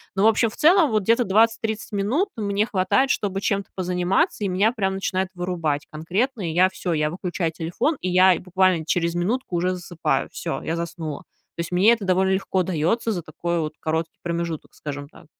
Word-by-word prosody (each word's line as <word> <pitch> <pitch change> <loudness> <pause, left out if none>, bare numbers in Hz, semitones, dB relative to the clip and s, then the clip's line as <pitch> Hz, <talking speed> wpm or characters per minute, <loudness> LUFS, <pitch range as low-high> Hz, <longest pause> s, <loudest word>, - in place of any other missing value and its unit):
Ну, 195 - +1
в 220 - +7
общем, 225 +1 +3
в - - -12
целом, 330 -3 +5
вот, 215 -2 +1
где-то 230 +4 +3
20-30 220 +2 +1
минут 215 - 0
мне 205 0 0
хватает, 210 +8 +2
чтобы 195 -1 -1
чем-то 200 -1 -1
позаниматься, 185 - 0
и - - +1
меня 195 +5 +2
прям 190 -5 -1
начинает 190 -1 -1
вырубать 170 -5 -2
конкретно. 190 - -2
И - - -3
я 185 +2 +4
всё- 180 -2 -3
я 150 -1 +1
выключаю 175 -2 -2
телефон, 170 - -1
и 185 - -1
я 185 0 +5
буквально 185 -2 +1
через 170 0 0
минутку 190 +2 -1
уже 180 +2 +1
засыпаю. 175 -2 -2
Всё, 165 - -4
я 165 - -2
заснула. 170 -3 -5 0.4
То - - -1
есть 170 +1 -6
мне 200 +6 +5
это 215 -4 -3
довольно 190 +1 +2
легко 190 0 0
дается 185 +7 0
за 175 -5 -3
такой 170 +2 -3
вот 155 -1 -3
короткий 160 +1 -2
промежуток, 170 -2 -4
скажем 145 -1 -6
так. 165 - -17
185 Hz, 195 wpm, -23 LUFS, 170-210 Hz, 0.4 s, в